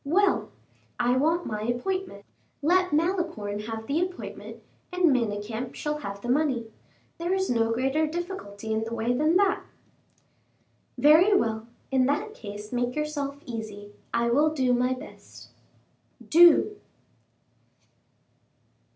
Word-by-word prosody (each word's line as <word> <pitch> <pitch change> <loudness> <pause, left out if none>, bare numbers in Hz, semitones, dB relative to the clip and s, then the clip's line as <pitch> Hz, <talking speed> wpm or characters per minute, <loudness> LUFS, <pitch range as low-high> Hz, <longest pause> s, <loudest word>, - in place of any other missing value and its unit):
"Well, 370 +7 +2 0.5
I 245 +1 +2
want 320 +6 +1
my 210 -1 -3
appointment. 240 - -3 0.4
Let 365 +3 +3
Malicorne 320 - -1
have 225 -1 -5
the 295 +8 0
appointment, 365 0 -6 0.3
and 360 -5 +3
Manicamp 225 +1 -3
shall 300 0 -3
have 200 -7 -6
the 240 - -6
money. 250 -4 0 0.5
There 345 +3 0
is 380 -5 0
no 230 -1 +2
greater 270 +6 +1
difficulty 305 - -5
in 220 0 0
the 230 +1 -4
way 230 +2 0
than 305 +7 +3
that." 400 0 +2 1.4
"Very 345 +8 +6
well; 220 - -1 0.2
in 260 -1 +3
that 295 +10 -1
case 210 - -9
make 245 0 -1
yourself 295 -2 -3
easy. 215 -3 -7 0.2
I 235 0 +1
will 295 +5 +4
do 260 -5 +1
my 250 +1 +2
best." - - -13 0.8
"Do." 345 +5 +6
265 Hz, 125 wpm, -26 LUFS, 225-335 Hz, 1.4 s, Very